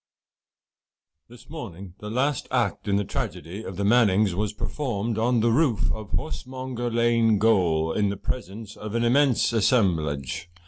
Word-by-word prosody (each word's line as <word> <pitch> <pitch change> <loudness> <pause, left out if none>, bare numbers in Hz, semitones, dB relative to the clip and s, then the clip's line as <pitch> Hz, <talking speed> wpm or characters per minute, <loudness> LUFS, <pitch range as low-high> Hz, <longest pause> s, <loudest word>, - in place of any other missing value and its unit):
This 120 +1 -16
morning 100 - -8
the 105 - -7
last 130 +4 0
act 125 -3 -1
in 100 - +2
the 100 - +1
tragedy 95 0 -5
of 95 -4 -7
the 100 - -1
Mannings' 105 -3 +4
was 105 +2 -1
performed 115 -2 -3
on 120 0 +2
the 115 +1 +3
roof 125 -4 +2
of 110 -2 -6
Horsemonger 130 -4 -4
Lane 115 -1 +3
Gaol, 85 -7 +2
in 105 -1 +1
the 100 - -3
presence 110 -1 -5
of 110 +1 -7
an 115 - +1
immense 130 0 +3
assemblage. 85 - +1
110 Hz, 150 wpm, -25 LUFS, 100-120 Hz, -, Mannings